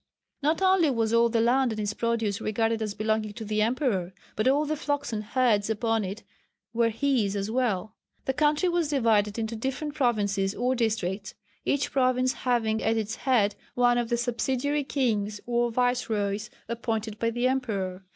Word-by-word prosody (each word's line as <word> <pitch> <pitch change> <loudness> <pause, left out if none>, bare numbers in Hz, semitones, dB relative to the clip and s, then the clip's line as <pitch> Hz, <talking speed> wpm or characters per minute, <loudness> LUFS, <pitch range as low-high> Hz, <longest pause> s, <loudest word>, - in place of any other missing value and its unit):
Not 310 +6 +1
only 375 -4 +4
was 230 -3 0
all 235 0 +5
the 230 0 +1
land 250 +2 +3
and 215 - -4
its 210 0 -1
produce 225 -4 -1
regarded 225 +1 0
as 210 -2 -3
belonging 215 0 -1
to 220 +1 -7
the 215 0 0
emperor, 220 - 0 0.2
but 215 +3 0
all 285 +3 +3
the 305 +1 -1
flocks 285 -3 -2
and 215 -1 -2
herds 225 -3 +1
upon 225 0 0
it 195 +2 -6 0.5
were 230 0 +3
his 230 -4 0
as 200 +2 -2
well. 220 -5 0 0.3
The 265 - 0
country 300 +5 +2
was 345 -3 +1
divided 220 -7 +2
into 225 0 -2
different 265 +6 -3
provinces 205 -7 0
or 250 +2 +1
districts, 210 -5 -2 0.3
each 280 0 0
province 255 -1 +2
having 225 -3 0
at 225 +1 +1
its 220 0 -2
head 220 -6 +2 0.2
one 245 0 +4
of 235 -1 -2
the 235 - +1
subsidiary 260 +4 -1
kings 215 -7 -1
or 240 0 +1
viceroys 220 -4 0 0.2
appointed 225 -2 -3
by 230 - +1
the 240 +2 0
emperor. 200 -8 -2
230 Hz, 175 wpm, -27 LUFS, 215-255 Hz, 0.5 s, all